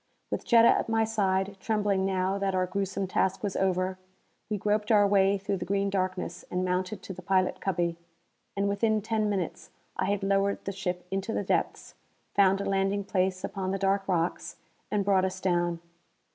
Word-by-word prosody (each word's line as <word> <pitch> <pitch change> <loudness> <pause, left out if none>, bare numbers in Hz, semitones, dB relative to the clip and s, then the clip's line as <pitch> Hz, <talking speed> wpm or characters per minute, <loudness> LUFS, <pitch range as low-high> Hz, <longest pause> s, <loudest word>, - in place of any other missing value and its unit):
With - - -3
Jetta 230 -1 +7
at - - +3
my 225 0 +2
side, 195 -3 0
trembling 205 -3 0
now 190 +1 0
that 195 -1 0
our 185 0 +2
gruesome 195 +1 -2
task 190 +1 0
was 200 -2 -2
over, 185 0 0 0.5
we 210 - -1
groped 210 +2 0
our 205 -2 +6
way 200 0 +3
through 195 0 -2
the 175 - -5
green 200 +1 0
darkness 185 -1 -2
and 180 +1 -1
mounted 185 +3 -2
to 190 - -6
the 185 - -10
pilot 185 0 +1
cubby. 170 -2 -1 0.6
And 200 0 +1
within 215 +1 +1
ten 220 -1 0
minutes 190 -5 -3 0.3
I - - 0
had 200 -1 -1
lowered 195 0 +1
the 195 - -2
ship 180 -2 -4
into 195 +3 -2
the - - -1
depths, - - -1 0.4
found 195 -1 +4
a 200 - -3
landing 195 +1 0
place 185 -1 0
upon 190 -2 -3
the 195 - 0
dark 195 0 +1
rocks, 175 -2 -1 0.3
and 205 -2 0
brought 195 -2 +3
us 190 0 -2
down. 175 -2 0
195 Hz, 185 wpm, -28 LUFS, 185-200 Hz, 0.6 s, Jetta